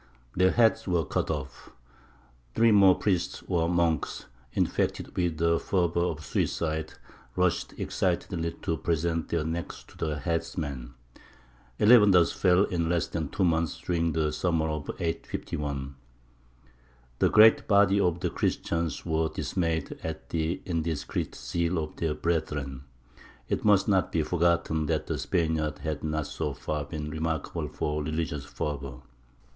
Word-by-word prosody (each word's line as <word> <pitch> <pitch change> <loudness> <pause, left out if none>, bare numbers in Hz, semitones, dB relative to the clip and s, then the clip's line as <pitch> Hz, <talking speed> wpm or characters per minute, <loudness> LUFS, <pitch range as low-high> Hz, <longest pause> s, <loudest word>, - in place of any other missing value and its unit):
Their 90 +1 +4
heads 115 0 +3
were 85 -3 +1
cut - - -1
off. 75 -5 -5 0.9
Three 115 0 +5
more 100 -3 +7
priests 90 -4 -1
or 85 -3 +1
monks, 85 -4 0 0.3
infected - - -1
with 85 -3 0
the 85 +1 +2
fever 85 -3 0
of 80 -3 -1
suicide, 80 +1 -1 0.4
rushed 90 -2 0
excitedly 85 -2 -1
to 80 - -1
present 85 0 -1
their 85 -2 0
necks 85 +2 -4
to - - -19
the 75 -2 -2
headsman. 70 -5 -3 0.8
Eleven 105 -1 +7
thus 90 -3 +5
fell 90 0 +3
in 85 -4 -1
less 85 -1 +1
than 80 -4 -4
two 95 - -1
months 85 -2 +1
during 85 -2 0
the 75 -1 0
summer 80 -1 0
of 75 -2 -4
851. 75 -4 -3 1.3
The - - +4
great 110 +1 +6
body 100 -1 +5
of 90 -3 +1
the - - -1
Christians 85 -3 -1
were 80 -1 +1
dismayed 80 -2 -2
at 80 -1 -6
the 80 +2 -1
indiscreet 80 -3 -2
zeal 85 +8 -1
of 75 -1 -4
their 80 -2 -1
brethren. 75 -5 -2 0.6
It - - -1
must 100 -3 +4
not 95 -5 +2
be 80 - +1
forgotten 85 -2 +1
that - - 0
the - - -3
Spaniards 80 -3 -1
had 75 -2 -3
not 75 -1 -1
so 70 0 -3
far 75 +1 -3
been 75 0 -5
remarkable 80 -1 -2
for 75 0 -2
religious 75 -1 -3
fervour. 70 -5 -5
80 Hz, 140 wpm, -28 LUFS, 75-90 Hz, 1.3 s, more